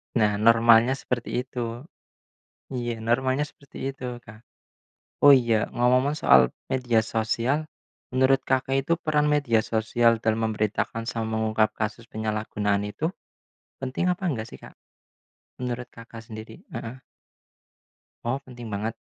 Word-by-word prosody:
Nah, 105 -3 +3
normalnya 115 +2 +5
seperti 125 -2 -2
itu. 120 -2 -5 0.9
Iya 120 -2 -3
normalnya 130 +5 +1
seperti 140 -1 -15 0.2
itu, 125 -2 -6
Kak. 110 +2 -13 0.8
Oh 145 - +10
iya, 120 -5 +5
ngomong-ngomong 125 +4 +2
soal 65 - +7 0.3
media 125 -3 +2
sosial, 115 +6 0 0.5
menurut 130 +1 +4
Kakak 130 0 +1
itu 165 - +1
peran 150 -1 +2
media 135 -7 +3
sosial 115 +1 +2
dalam 110 0 +1
memberitakan 110 +2 -1
sama 115 -1 -2
mengungkap 110 -1 +1
kasus 110 +1 -3
penyalahgunaan 105 -2 -1
itu 155 - -4 0.8
penting 130 +6 -2
apa 180 +2 -6
enggak 115 -6 -3
sih, - - -10
Kak? - - -13 0.9
Menurut, 125 0 -4
Kakak 115 0 -10
sendiri? 110 0 -9 0.2
Heeh. 115 +2 -6 1.3
Oh 120 +3 -1
penting 120 -4 -10
banget. 105 +3 -3
115 Hz, 125 wpm, -25 LUFS, 110-130 Hz, 1.3 s, Oh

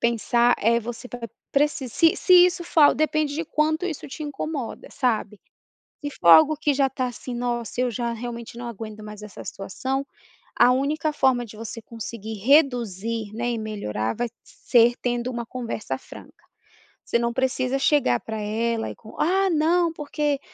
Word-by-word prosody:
pensar 235 +1 +3
é, 230 +2 +3
você 240 +2 -7
vai 240 -1 -6 0.2
preci 285 -2 +1
se 330 +8 +3
se 360 -1 +7
isso 350 -1 -2
for 335 - +1
al 290 - +7
depende 310 -1 0
de 325 +3 -2
quanto 315 +2 0
isso 325 -6 -5
te 275 - -7
incomoda, 290 -3 -5
sabe. 215 -5 -1 0.6
Se 290 - -3
for 170 - +2
algo 170 - +8
que 295 -1 +1
já 270 0 +3
tá, 255 -1 -2
assim, 245 0 -6
"Nossa, 240 -1 -2
eu 250 -1 +1
já 235 +1 -2
realmente 235 0 -7
não 240 - -6
aguento 215 -1 -8
mais 210 0 -9
essa 210 -2 -10
situação", 265 +8 -4 0.5
a 250 - +7
única 300 +4 0
forma 260 -4 +2
de 220 -2 -12
você 225 +1 -7
conseguir 225 -1 -7
reduzir, 230 - +2
né, 240 +2 -1
e 235 - -2
melhorar 200 - -3
vai 240 +1 -1
ser 240 -1 +3
tendo 245 0 -1
uma 240 -1 -4
conversa 235 -2 -4
franca. - - -14 0.6
Você - - +1
não 235 0 0
precisa 260 +1 0
chegar 270 - +3
pra 220 -1 -6
ela 225 +2 -1
e - - -10
com 220 - -14
"Ah, 380 +4 +2
não, 335 +1 +2
porque 295 -2 -1
245 Hz, 175 wpm, -24 LUFS, 225-290 Hz, 0.6 s, algo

